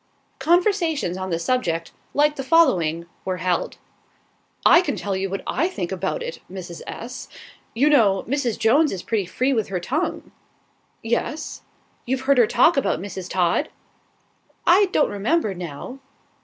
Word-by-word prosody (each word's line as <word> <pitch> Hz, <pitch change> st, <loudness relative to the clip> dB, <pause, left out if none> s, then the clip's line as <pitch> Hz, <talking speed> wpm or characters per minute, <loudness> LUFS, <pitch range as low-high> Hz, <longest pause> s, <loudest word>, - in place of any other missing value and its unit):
Conversations 340 Hz, -, +2 dB
on 190 Hz, 0 st, -4 dB
the 165 Hz, -, 0 dB
subject, 170 Hz, -5 st, -1 dB, 0.2 s
like 295 Hz, +1 st, +3 dB
the 275 Hz, -, -4 dB
following, 180 Hz, -, +3 dB, 0.2 s
were 185 Hz, -1 st, -2 dB
held: 180 Hz, -1 st, -1 dB, 0.9 s
"I 340 Hz, -, +8 dB
can 360 Hz, -, -2 dB
tell 200 Hz, -1 st, -3 dB
you 190 Hz, +1 st, -2 dB
what 195 Hz, +1 st, -4 dB
I 330 Hz, +6 st, 0 dB
think 190 Hz, -, -4 dB
about 190 Hz, -, -2 dB
it, 485 Hz, 0 st, -6 dB
Mrs. 175 Hz, -3 st, -8 dB
S. 245 Hz, +2 st, -7 dB, 0.5 s
You 270 Hz, +6 st, +3 dB
know, 220 Hz, -10 st, +4 dB
Mrs. 255 Hz, -3 st, -1 dB
Jones 270 Hz, +7 st, +3 dB
is 185 Hz, -2 st, -5 dB
pretty 210 Hz, -5 st, -1 dB
free 255 Hz, +8 st, 0 dB
with 220 Hz, -4 st, 0 dB
her 185 Hz, -2 st, -2 dB
tongue?" 275 Hz, -, -3 dB, 0.7 s
"Yes." 235 Hz, +7 st, -2 dB, 0.5 s
"You've 260 Hz, +1 st, -1 dB
heard 270 Hz, 0 st, +3 dB
her 235 Hz, -, +6 dB
talk 255 Hz, +8 st, +4 dB
about 275 Hz, -, +1 dB
Mrs. 190 Hz, -1 st, -7 dB
Todd?" 180 Hz, -, +1 dB, 1.0 s
"I 370 Hz, +4 st, +6 dB
don't 360 Hz, -5 st, +1 dB
remember, 215 Hz, +3 st, 0 dB
now." 180 Hz, -, -7 dB
235 Hz, 155 wpm, -23 LUFS, 185-295 Hz, 1.0 s, I